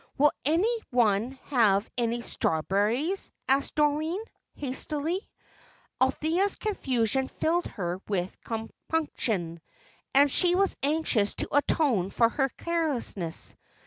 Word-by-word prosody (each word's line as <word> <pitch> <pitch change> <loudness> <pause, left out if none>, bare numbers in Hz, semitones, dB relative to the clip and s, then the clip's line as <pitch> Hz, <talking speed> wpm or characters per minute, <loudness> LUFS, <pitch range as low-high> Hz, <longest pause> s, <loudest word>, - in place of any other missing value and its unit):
"Will 295 +1 +5
any 390 - +2
one 235 -1 +2
have 215 -7 +3
any 235 0 -1
strawberries?" 215 - 0 0.2
asked 275 +1 +1
Doreen, 305 +4 +1 0.4
hastily. 300 +6 -3 0.7
Althea's 320 +9 +2
confusion 265 - 0
filled 340 +5 0
her 180 -2 -4
with 190 -3 -3
compunction, 220 - -3 0.5
and 285 +1 +6
she 355 +4 +5
was 390 +1 +2
anxious 280 -8 +1
to - - -1
atone 270 - +2
for 230 +3 +3
her 270 +3 0
carelessness. 275 - -2
265 Hz, 105 wpm, -28 LUFS, 215-315 Hz, 0.7 s, and